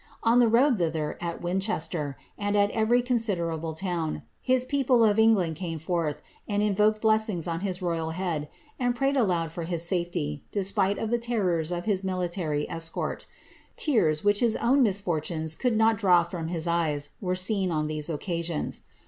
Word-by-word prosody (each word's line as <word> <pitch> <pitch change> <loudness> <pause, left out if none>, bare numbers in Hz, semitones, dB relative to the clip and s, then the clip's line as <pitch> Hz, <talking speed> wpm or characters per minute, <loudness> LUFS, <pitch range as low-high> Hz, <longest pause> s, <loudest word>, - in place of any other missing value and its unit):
On 230 +2 +4
the 240 - +5
road 240 +1 +4
thither, 160 -3 -1
at 170 0 -4
Winchester, 175 - -2 0.2
and 205 0 -1
at 205 0 +3
every 235 +2 +2
considerable 170 -10 -1
t')vn, 170 -3 -3 0.2
his 255 -1 +2
people 255 -4 +3
of 210 0 +3
England 195 -8 +3
came 170 -2 -4
forth 160 -1 -2 0.2
and 205 0 0
invoked 210 +1 +2
blessings 215 -6 +2
on 165 -1 -2
his 185 -1 -3
f'Hal 165 -2 -2
head, 165 -5 -3 0.3
and 245 -1 +1
prayed 275 +2 +1
aloud 175 - +1
for 165 0 -5
his 170 -1 -2
safety, 170 - -2
despite 200 0 0
of 225 - -3
the 240 - +2
terrors 185 -9 0
of 175 0 -3
his 200 -4 +1
Niiary 175 -5 -2
escort' 165 0 -4 0.5
Tears, 175 - +1
which 205 0 +3
his 230 -2 +2
own 265 +4 +3
misfortunes 170 - +1
could 245 +1 0
not 220 0 +3
draw 180 -5 +5
from 170 -1 -5
^■'■* 170 -1 0
eves, 145 0 -4
were 185 -2 -1
seen 190 0 +1
on 155 -2 0
these 155 +1 -3
occasions. 165 0 -3
180 Hz, 170 wpm, -27 LUFS, 165-220 Hz, 0.5 s, the